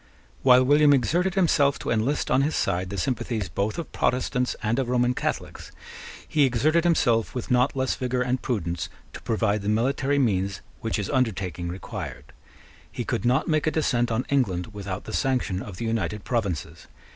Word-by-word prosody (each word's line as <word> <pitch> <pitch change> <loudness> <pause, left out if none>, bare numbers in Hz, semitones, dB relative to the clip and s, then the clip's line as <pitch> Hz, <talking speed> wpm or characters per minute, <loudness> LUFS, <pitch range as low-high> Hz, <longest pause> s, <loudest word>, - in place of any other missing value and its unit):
While 125 -1 +6
William 145 +2 +5
exerted 175 +8 +1
himself 145 -7 +3
to - - -4
enlist 115 +6 0
on 130 - +4
his 150 +3 0
side 90 +1 0
the 100 - -5
sympathies 110 -2 -2
both 100 +7 -2
of 170 - -5
Protestants 125 0 0
and 115 +4 +1
of 130 -2 -1
Roman 125 0 +2
Catholics, - - -4 0.6
he 150 - +2
exerted 150 +7 +2
himself 120 -11 +2
with 125 - -4
not 125 +3 +3
less 130 -1 0
vigour 125 0 -1
and 125 +1 -1
prudence 85 -8 -2 0.2
to - - -9
provide 110 -2 0
the 100 - -2
military 135 +5 +1
means 100 -7 0 0.2
which 110 - -2
his 100 -2 -2
undertaking 95 -8 -1
required. 75 -6 -7 0.6
He - - -4
could 95 - -2
not 125 +5 +2
make 155 -1 +1
a - - +6
descent 125 -7 +1
on 115 +3 -1
England 110 -8 0
without 100 -1 -5
the - - -8
sanction 125 -8 0
of 95 -3 -8
the 115 - -4
United 110 -2 -2
Provinces. 105 - -3
120 Hz, 180 wpm, -25 LUFS, 105-135 Hz, 0.6 s, While